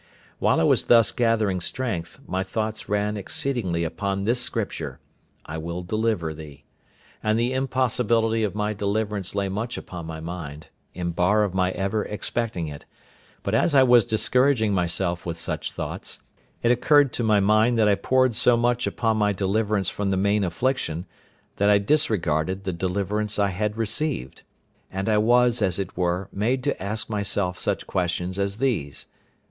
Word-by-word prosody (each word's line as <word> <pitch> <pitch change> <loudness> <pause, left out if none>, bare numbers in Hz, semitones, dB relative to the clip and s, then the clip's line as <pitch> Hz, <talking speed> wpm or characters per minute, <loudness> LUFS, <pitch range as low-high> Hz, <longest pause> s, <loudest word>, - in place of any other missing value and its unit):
While - - +3
I - - +3
was - - +3
thus 115 -2 +5
gathering 110 -5 +1
strength, 95 -6 -3
my 95 +1 -2
thoughts 110 +3 -3
ran 105 +1 0
exceedingly 100 -5 -2
upon 100 +4 -2
this 120 +4 +1
Scripture, - - -3 0.5
"I 80 +1 -5
will 85 +2 -5
deliver 105 -4 -1
thee"; 75 -2 -11 0.6
and 110 +1 +1
the 120 +2 +1
impossibility 120 -4 +1
of 105 -2 -2
my 105 0 -1
deliverance 100 -1 -2
lay 100 -1 0
much 105 +5 -3
upon 85 -3 -7
my 80 -1 -6
mind, 80 -3 -7 0.3
in 85 -1 -2
bar 90 +5 +3
of 100 -3 -1
my 95 -1 +2
ever 100 +2 -1
expecting 105 -3 -3
it; 75 -2 -9 0.6
but 100 - -2
as 145 +7 +2
I 135 - +7
was 120 -2 +6
discouraging 110 +1 +2
myself 85 -1 0
with 85 -1 -4
such - - -3
thoughts, - - -5 0.4
it 120 - +4
occurred 140 +2 +4
to 120 - -2
my 105 -2 +4
mind 110 +4 +3
that 110 -2 +4
I 105 - +5
pored 130 +4 +2
so 120 +2 +4
much 120 +1 +1
upon 110 -2 0
my 105 -1 +2
deliverance 100 0 0
from 100 -1 -2
the 95 - +1
main 100 +2 +2
affliction, 90 - -1 0.5
that 100 +1 +3
I 105 - +6
disregarded 95 - +1
the 95 - -2
deliverance 100 +4 -2
I 100 -1 +2
had 105 +3 -2
received, 115 - -2 0.5
and 95 +1 -3
I 105 -1 +3
was 120 +1 +3
as 95 -4 +1
it 95 -2 -4
were 90 +1 -1
made 120 +6 0
to - - -1
ask 105 +2 -3
myself 100 -3 -1
such - - -1
questions 90 +1 -2
as 100 +1 -1
these—viz. 115 - -1
105 Hz, 170 wpm, -24 LUFS, 90-115 Hz, 0.6 s, I